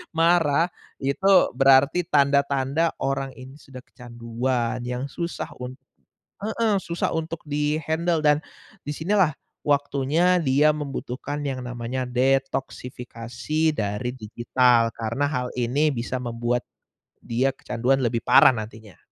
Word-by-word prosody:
marah 165 0 +3 0.3
itu 140 +9 +1 0.2
berarti 135 +6 +4
tanda-tanda 140 +1 +2
orang 135 -1 -2
ini 130 +3 -12
sudah 130 -1 -12
kecanduan 120 +1 -3
yang 125 +3 -4
susah 170 0 -5
un 125 +1 -6 0.7
heeh, 220 -1 +1
susah 170 -1 -2
untuk 160 0 -3
di-handle 155 +3 0
dan, 150 0 +2 0.4
disinilah 160 +4 +1 0.3
waktunya 145 +5 +2
dia 150 -1 +3
membutuhkan 145 0 -5
yang 130 -3 -4
namanya 125 +1 -4
detoksifikasi 130 +2 -1
dari 110 +2 -3
digital 120 0 +2
karena 115 +5 -2
hal 125 -4 -2
ini 135 +6 +1
bisa 125 -1 -3
membuat, 120 0 -1 0.6
dia 130 +3 0
kecanduan 125 +3 0
lebih 115 -1 0
parah - - +6
nantinya. 110 -4 -8
135 Hz, 110 wpm, -24 LUFS, 125-150 Hz, 0.7 s, parah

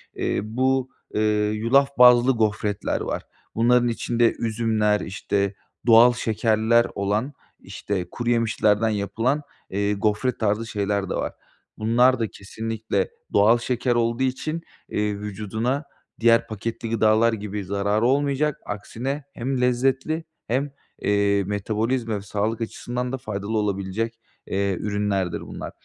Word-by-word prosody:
eee, - - -1
bu, 130 +4 0 0.2
eee, 105 -1 +2
yulaf 120 +6 +3
bazlı 125 +1 +7
gofretler 105 -3 -1
var, - - -3 0.3
bunların 120 +2 +4
içinde 115 0 +1
üzümler, 110 -2 +1
işte, 100 +1 -1 0.3
doğal 115 +2 +8
şekerler 110 0 +2
olan, 105 +8 -1 0.3
işte, 95 -4 -4
kuruyemişlerden 115 -2 +1
yapılan, 110 +7 0 0.3
eee, 100 +2 0
gofret 105 +5 0
tarzı 110 +1 0
şeyler 100 -3 -1
de - - -1
var, - - -2 0.4
bunlarda 115 +2 +3
kesinlikle 110 +3 -3 0.2
doğal 110 +4 +5
şeker 125 0 0
olduğu 115 +2 +1
için, 155 +5 -2 0.3
eee, 105 -1 -1
vücuduna 110 +6 -2 0.4
diğer 115 0 +4
paketli 115 +2 -5
gıdalar 110 +1 +3
gibi 105 -1 -4
zararı 100 +3 0
olmayacak, 140 +2 +1
aksine 130 +7 -4
hem 130 +1 -2
lezzetli 135 +6 +1 0.2
hem, 135 +4 0 0.3
eee, 100 -1 +2
metabolizma 110 +4 -1
ve - - -6
sağlık 105 +3 -2
açısından 125 +2 -3
da 135 - -2
faydalı 110 -3 -3
olabilecek, 105 +2 -2 0.3
eee, 100 0 0
ürünlerdir 100 -3 -1
bunlar. - - -7
110 Hz, 120 wpm, -24 LUFS, 105-120 Hz, 0.4 s, doğal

